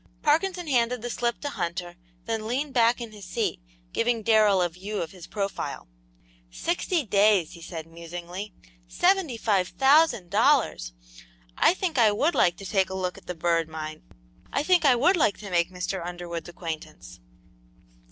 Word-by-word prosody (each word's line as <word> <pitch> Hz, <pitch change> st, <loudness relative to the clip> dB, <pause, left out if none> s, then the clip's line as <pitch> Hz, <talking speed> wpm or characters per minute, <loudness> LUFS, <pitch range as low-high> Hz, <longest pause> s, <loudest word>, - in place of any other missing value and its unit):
Parkinson 350 Hz, +4 st, +1 dB
handed 245 Hz, -4 st, +1 dB
the 240 Hz, -, -3 dB
slip 240 Hz, 0 st, -1 dB
to 290 Hz, -, -3 dB
Hunter, 175 Hz, -6 st, -4 dB, 0.3 s
then 220 Hz, -1 st, -3 dB
leaned 270 Hz, +4 st, -2 dB
back 235 Hz, 0 st, +3 dB
in 235 Hz, -2 st, -6 dB
his 205 Hz, -3 st, -11 dB
seat, 180 Hz, -, -2 dB, 0.3 s
giving 230 Hz, -1 st, 0 dB
Darrell 215 Hz, -3 st, +4 dB
a -, -, +2 dB
view 195 Hz, +5 st, -6 dB
of 165 Hz, -, -4 dB
his 180 Hz, -3 st, -12 dB
profile. 200 Hz, -, -4 dB, 0.6 s
"Sixty 340 Hz, -, -1 dB
days!" 200 Hz, -4 st, +3 dB
he 170 Hz, -, -12 dB
said, 165 Hz, -1 st, -7 dB
musingly. 175 Hz, +4 st, -8 dB, 0.4 s
"Seventy 360 Hz, -9 st, +1 dB
five 200 Hz, -5 st, +1 dB
thousand 270 Hz, -, +3 dB
dollars! 220 Hz, -, +2 dB, 0.6 s
I -, -, +4 dB
think 350 Hz, -8 st, -1 dB
I 220 Hz, -3 st, +6 dB
would 290 Hz, +11 st, +1 dB
like 175 Hz, 0 st, +3 dB
to 195 Hz, -, -9 dB
take 190 Hz, 0 st, +1 dB
a 190 Hz, -, -5 dB
look 180 Hz, -1 st, -2 dB
at -, -, -15 dB
the 180 Hz, -, -4 dB
Bird 165 Hz, -1 st, 0 dB
Mine! 155 Hz, 0 st, -6 dB, 0.5 s
I 280 Hz, -, 0 dB
think 355 Hz, -1 st, +3 dB
I 265 Hz, -3 st, +6 dB
would 315 Hz, +11 st, +4 dB
like 220 Hz, -10 st, +2 dB
to 200 Hz, -2 st, -9 dB
make 170 Hz, -1 st, +2 dB
Mr. 180 Hz, 0 st, -4 dB
Underwood's 175 Hz, -1 st, -6 dB
acquaintance!" 165 Hz, -2 st, -8 dB
205 Hz, 170 wpm, -26 LUFS, 175-250 Hz, 0.6 s, I